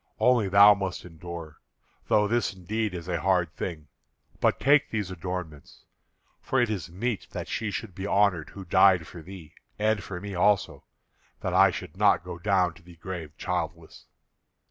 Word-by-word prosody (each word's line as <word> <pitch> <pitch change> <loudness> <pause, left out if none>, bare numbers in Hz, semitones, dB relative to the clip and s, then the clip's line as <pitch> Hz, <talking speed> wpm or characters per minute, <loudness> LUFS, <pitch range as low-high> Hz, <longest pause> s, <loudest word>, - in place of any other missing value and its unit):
Only 115 -3 +3
thou 100 +2 +8
must 95 -3 -4
endure, 85 -2 -9 0.5
though 105 -1 +3
this 115 -2 0
indeed 105 +2 -3
is 85 -1 -7
a 85 -3 -2
hard 90 -4 +1
thing. 80 -5 -5 0.5
But - - +2
take 145 +2 +4
these 105 -4 -3
adornments, 90 -5 -7 0.6
for 130 - 0
it 120 -3 +2
is 90 -5 -4
meet 100 +2 -3
that - - -5
she 110 - -2
should 100 0 -5
be 95 +3 -5
honoured 100 -7 +2
who 100 -1 -10
died 90 -1 +5
for 85 - -11
thee, 85 -2 -11 0.2
and 110 0 +1
for 95 -3 -6
me 100 +1 -7
also, 100 +2 +1 0.6
that - - -2
I - - +6
should - - -7
not - - +4
go 90 -1 -7
down 95 -3 +2
to 85 - -18
the 85 0 -15
grave 85 -3 -7
childless." 85 -3 -4
95 Hz, 170 wpm, -27 LUFS, 85-105 Hz, 0.6 s, thou